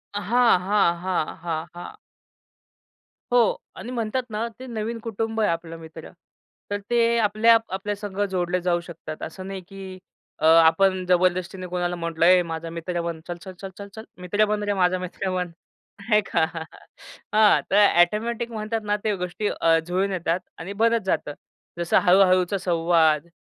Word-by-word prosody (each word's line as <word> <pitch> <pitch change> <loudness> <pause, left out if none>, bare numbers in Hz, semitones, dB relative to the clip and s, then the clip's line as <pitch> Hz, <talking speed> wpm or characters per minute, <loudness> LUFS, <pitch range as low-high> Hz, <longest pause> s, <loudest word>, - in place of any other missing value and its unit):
हां, 230 0 +3
हां, 200 -4 +3
हां, 185 -4 -2
हां, 165 -1 -3
हां. 175 - -9 1.4
हो - - +6 0.4
आणि 245 - -7
म्हणतात 240 +1 -2
ना, 220 +2 -2
ते 260 - -8
नवीन 230 0 -4
कुटुंब 225 0 -3
आहे 210 - +2
आपलं 165 0 -5
मित्र. 160 -1 -11 0.6
तर 205 - -1
ते 235 -1 +3
आपल्या 220 +2 +5
आपल्या 195 +2 -3
संग 200 -1 -7
जोडले 180 -1 0
जाऊ 175 -1 +1
शकतात 165 -2 -9
असं 185 +4 -7
नाही, 195 -1 -6
की 190 -1 -9 0.4
अ, - - 0
आपण 165 +4 +5
जबरदस्तीने 185 +1 +1
कोणाला 175 0 -2
म्हटलं, 170 -1 -1
"ए 180 +1 +6
माझा 165 0 -5
मित्र 170 +1 -4
बन 170 -1 -4
चल-चल-चल-चल-चल 190 +4 -9 0.2
मित्र 205 +4 +2
बन 210 0 -1
रे 205 0 0
माझा 185 -1 +2
मित्र 185 +1 -4
बन" 180 -1 -1 0.5
नाही 210 0 +3
का? - - +1 0.9
हां, 215 -1 +5
तर 205 +1 +6 0.2
ऑटोमॅटिक 230 +6 0
म्हणतात 220 0 -3
ना 205 0 +1
त्या 215 -2 0
गोष्टी 180 +4 -3
अ, 165 0 +5
जुळून 190 +3 0
येतात 170 -1 -1 0.2
आणि 185 +5 -6
भरत 230 0 +4
जातं. 150 -5 -1 0.5
जसं 170 -1 +2
हळू-हळूचा 185 +1 +4
संवाद 165 -3 +2
185 Hz, 155 wpm, -24 LUFS, 175-210 Hz, 1.4 s, हो